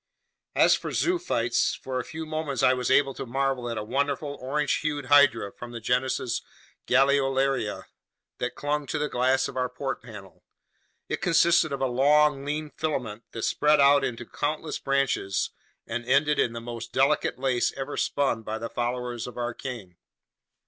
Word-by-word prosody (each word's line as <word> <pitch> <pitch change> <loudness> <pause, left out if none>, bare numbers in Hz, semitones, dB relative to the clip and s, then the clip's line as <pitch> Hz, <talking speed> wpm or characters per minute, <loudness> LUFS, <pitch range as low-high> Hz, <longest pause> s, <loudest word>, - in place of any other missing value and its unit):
As - - +6
for - - -2
zoophytes, 345 - +1
for 130 -1 -4
a - - -3
few 160 0 -7
moments 155 -4 -3
I 130 - +6
was 125 -1 -2
able 135 0 +4
to - - -6
marvel 135 -1 -1
at 115 - -3
a - - -2
wonderful, 140 +4 -1
orange 145 +3 0
hued 145 -3 -2
hydra 135 -7 +5
from 120 0 -9
the 120 - -5
genus 125 +1 0 0.5
Galeolaria 135 -5 +2 0.6
that 125 0 -3
clung 145 0 -2
to 155 - -2
the 150 0 -1
glass 130 +2 +2
of - - -9
our 125 -1 0
port 135 +2 -4
panel; 105 -5 -12 0.6
it - - -3
consisted 170 -2 +4
of 140 -1 -3
a - - +3
long, 140 +3 +3
lean 150 +1 -3
filament 125 -8 -3
that 115 - -5
spread 150 0 +3
out 140 0 +6
into 120 -2 -3
countless 150 +4 -3
branches 135 -8 0 0.3
and 115 +1 -4
ended 145 +3 +3
in 115 - +2
the 115 - -5
most 115 0 -7
delicate 130 -2 +2
lace 130 -2 +1
ever 135 +1 -4
spun 140 -5 0
by 110 0 -4
the 115 +1 -5
followers 120 -1 -3
of 125 - -10
Arachne. 120 -6 -5
135 Hz, 170 wpm, -26 LUFS, 120-145 Hz, 0.6 s, As